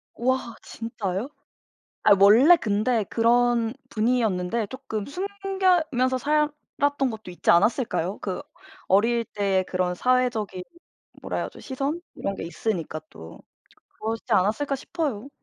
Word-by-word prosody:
와 250 -1 -1
진짜요? 225 0 -4 0.8
아 - - +5
원래 235 - +7
근데 215 -1 0
그런 235 +1 +2 0.2
분이었는데 220 -2 0
쪼끔 220 -4 -5
숨기면서 360 -8 0
살았던 285 -1 0
것도 220 -4 -8
있지 175 - 0
않았을까요? 200 0 +2
그 190 +7 -4 0.5
어릴 230 +4 +3
때 195 -3 0
그런 180 -1 0
사회적인 235 -4 0 0.6
뭐라 - - -3
해야죠 - - -5
시선 280 +5 -3
이런게 195 -3 -4
있으니까 170 -3 -3
또. 80 0 -12 0.6
그러시지 225 +1 -4
않았을까 220 +10 +1
싶어요. 275 - -4
230 Hz, 270 characters per minute, -25 LUFS, 200-270 Hz, 0.8 s, 원래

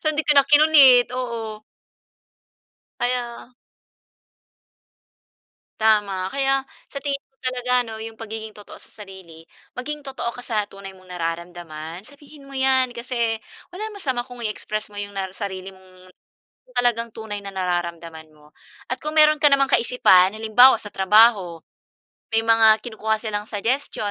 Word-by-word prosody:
So, 310 - +2
hindi 305 - 0
ko 295 - +4
na 280 - +7
kinulit, 290 -5 +6
oo. 225 -4 -5 1.4
Kaya 245 0 -3 2.3
Tama. 200 -4 +1
Kaya 270 -1 +1 0.2
sa 280 - -6
tingin 280 -1 -2
ko 270 - -50
talaga 250 -1 0
ano 220 -1 -8
yung 225 0 -8
pagiging 220 -1 -8
totoo 205 - -13
sa - - -12 0.2
sarili, 170 -4 -14 0.3
maging 300 +4 -5
totoo 265 -4 -5
ka 245 - -10
sa 220 -4 -2
tunay 195 -1 -12
mong 185 -1 -15
nararamdaman. 165 -1 -6
Sabihin 285 +2 -15
mo 275 - -9
yan 260 -2 +2
kasi 235 -2 -2 0.3
walang 425 +4 -7
masama 260 -11 -3
kung 245 -1 -12
i-express 215 -1 -4
mo 205 - -16
na 205 - -3
yung 200 0 -13 0.2
sarili 190 -2 -6
mong 185 0 -19 0.7
talagang 235 -1 +1
tunay 215 -3 -6
na 195 - -7
nararamdaman 170 -3 -4
mo. 150 0 -22 0.4
At 255 - -2
kung 305 +1 -5
meron 305 0 +6
ka 295 - +5
namang 275 0 +3
kaisipan, 210 -6 +4
halimbawa, 225 +4 +6
sa 210 - -9
trabaho 195 -3 +4 0.7
may 225 - +3
mga 225 -1 +5
kinukuha 220 -2 -2
silang 210 -2 -4
suggestion 220 0 -2
225 Hz, 145 wpm, -22 LUFS, 195-255 Hz, 2.3 s, na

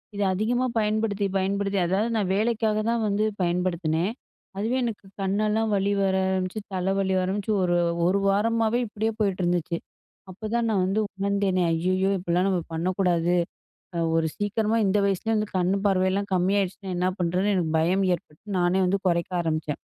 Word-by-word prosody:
இத 205 - -3
அதிகமா 235 +6 0
பயன்படுத்தி 210 -1 0
பயன்படுத்தி, 195 +1 0
அதாவது 200 +6 +1
நான் 195 -3 0
வேலைக்காக 220 0 +1
தான் 230 -1 +1
வந்து 205 +1 +1 0.2
பயன்படுத்தினேன். 175 0 0 0.5
அதுவே 225 +6 0
எனக்கு 225 -4 -4 0.2
கண்ணெல்லாம் 210 +3 +1
வலி 200 +1 +1
வர 190 -1 +2
ஆரம்பிச்சு, 185 +2 -1
தலை 185 +1 0
வலி 190 -1 +1
ஆரம்பிச்சு, 195 +3 -2
ஒரு 175 -1 +2 0.3
1 190 +3 +3
வாரமாவே 225 +3 +2
இப்படியே 215 +1 -2
போயிட்டு 195 -3 0
இருந்துச்சு. 175 -1 0 0.5
அப்பதான் 225 +5 -2
நான் 205 -4 +2
வந்து 195 +3 0 0.2
உணர்ந்தேனே. 200 -1 0
"ஐயயோ! 185 +3 +1
இப்படிலாம் 180 +1 0
நம்ம 185 -2 +1
பண்ணக்கூடாது 175 0 +1 0.9
ஒரு 165 0 +2
சீக்கிரமா 215 +2 0
இந்த 195 +2 +2
வயசுலயே 200 +3 0
வந்து 210 0 -1
கண் 180 0 +2
பார்வையெல்லாம் 195 0 +1
கம்மி 185 +1 +2
ஆயிடுச்சுனா 195 0 -3
என்ன 180 +1 +1
பண்ணுறதுன்னு" 180 +3 +1
எனக்கு 165 -4 0
பயம் 180 +5 +2
ஏற்பட்டு, 155 -2 -11 0.2
நானே 175 +2 +2
வந்து 195 +2 +1
குறைக்க 170 0 0
ஆரம்பிச்சேன். 155 -2 -2
195 Hz, 155 wpm, -25 LUFS, 180-210 Hz, 0.9 s, 1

